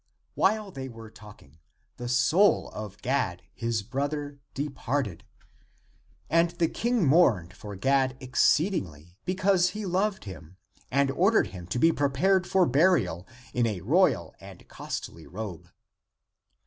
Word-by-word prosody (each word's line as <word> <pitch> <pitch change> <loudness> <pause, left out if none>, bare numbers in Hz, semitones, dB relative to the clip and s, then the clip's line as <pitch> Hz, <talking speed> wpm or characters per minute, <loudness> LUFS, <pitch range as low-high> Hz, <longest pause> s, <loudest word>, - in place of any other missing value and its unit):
While 210 0 +1
they 135 -4 -6
were 115 -2 -11
talking, 105 -10 -16 0.4
the 120 0 -5
soul 155 +12 +3
of 105 -1 -8
Gad, 120 -10 -1
his 115 -2 -2
brother, 145 +4 -3 0.2
departed, 135 - -3 1.0
and 165 +3 +3
the 170 -1 0
King 235 -5 0
mourned 125 - +3
for 105 +1 -9
Gad 130 +4 +1
exceedingly, 115 - 0
because 185 -1 +2
he 215 - -4
loved 190 +2 0
him, 95 -3 -11 0.3
and 140 0 +2
or 185 +8 +3
dered 225 - +3
him 90 -3 -8
to 95 - -3
be 165 +6 +5
prepared 165 +7 +1
for 190 -2 +3
burial 125 - +2 0.3
in 120 -1 +2
a 100 -5 -3
royal - - +2
and - - -13
costly 80 -1 -7
robe. 90 -3 -7
130 Hz, 135 wpm, -27 LUFS, 105-175 Hz, 1.0 s, be